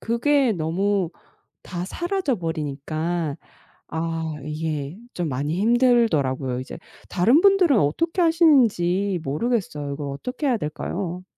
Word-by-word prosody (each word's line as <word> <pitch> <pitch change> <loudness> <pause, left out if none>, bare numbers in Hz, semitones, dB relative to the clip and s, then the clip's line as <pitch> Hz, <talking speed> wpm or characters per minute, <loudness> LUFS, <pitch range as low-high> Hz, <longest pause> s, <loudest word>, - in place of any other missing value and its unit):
그게 260 +3 +2
너무 185 +2 0 0.6
다 175 -1 -5
사라져 345 - -1
버리니까 160 -1 -3 0.5
아 165 -1 -3
이게 150 +1 -4 0.2
좀 175 -3 -2
많이 145 +7 -2
힘들더라고요 205 - +2
이제. 130 - -7 0.3
다른 225 - +4
분들은 370 - +5
어떻게 330 - 0
하시는지 220 - +3
모르겠어요. 150 - -2
이걸 145 0 -5
어떻게 250 - -4
해야 250 -3 +2
될까요? 175 +2 -4
175 Hz, 280 characters per minute, -23 LUFS, 155-240 Hz, 0.6 s, 분들은